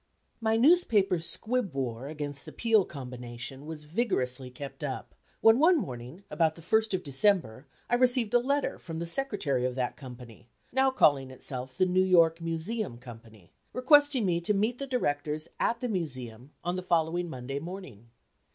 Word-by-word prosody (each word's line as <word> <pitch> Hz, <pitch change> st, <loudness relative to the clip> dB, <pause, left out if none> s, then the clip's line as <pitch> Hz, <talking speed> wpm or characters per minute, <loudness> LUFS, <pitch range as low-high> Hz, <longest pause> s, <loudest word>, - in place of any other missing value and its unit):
My 225 Hz, -1 st, +1 dB
newspaper 225 Hz, -, +4 dB
squib 215 Hz, -, -1 dB
war 130 Hz, -1 st, -3 dB
against 145 Hz, -2 st, -6 dB
the -, -, -9 dB
Peale 220 Hz, -4 st, +3 dB
combination 125 Hz, 0 st, -7 dB
was 160 Hz, -2 st, -7 dB
vigorously 145 Hz, -, -1 dB
kept 135 Hz, +2 st, -9 dB
up; 135 Hz, -3 st, -5 dB, 0.3 s
when 225 Hz, +2 st, +6 dB
one 340 Hz, +4 st, +6 dB
morning, 130 Hz, -, -6 dB
about 160 Hz, -2 st, +2 dB
the 165 Hz, -, -13 dB
first 220 Hz, +2 st, +2 dB
of 185 Hz, -, -4 dB
December, 140 Hz, -, +1 dB, 0.2 s
I -, -, -3 dB
received 245 Hz, -2 st, +3 dB
a 245 Hz, -, +6 dB
letter 280 Hz, +3 st, -1 dB
from 165 Hz, -2 st, -7 dB
the 170 Hz, -, -3 dB
Secretary 170 Hz, -, -1 dB
of 125 Hz, 0 st, -1 dB
that 125 Hz, -2 st, -2 dB
company 125 Hz, -3 st, -12 dB, 0.2 s
(now 265 Hz, +1 st, +3 dB
calling 145 Hz, -, +3 dB
itself 130 Hz, 0 st, -6 dB
the 185 Hz, -, +4 dB
"New 185 Hz, +1 st, +2 dB
York 170 Hz, -3 st, +4 dB
Museum 165 Hz, -, -3 dB
Company,") 115 Hz, -6 st, -13 dB, 0.2 s
requesting 290 Hz, -2 st, +4 dB
me 170 Hz, -2 st, +1 dB
to 205 Hz, +4 st, +1 dB
meet 220 Hz, +5 st, 0 dB
the 275 Hz, -, -4 dB
directors 150 Hz, -, -1 dB
at 235 Hz, 0 st, 0 dB
the 250 Hz, -, -1 dB
Museum 130 Hz, -, -5 dB
on 175 Hz, +1 st, -1 dB
the -, -, -2 dB
following 170 Hz, 0 st, 0 dB
Monday 135 Hz, 0 st, -5 dB
morning. 145 Hz, -, -9 dB
165 Hz, 170 wpm, -29 LUFS, 130-220 Hz, 0.3 s, when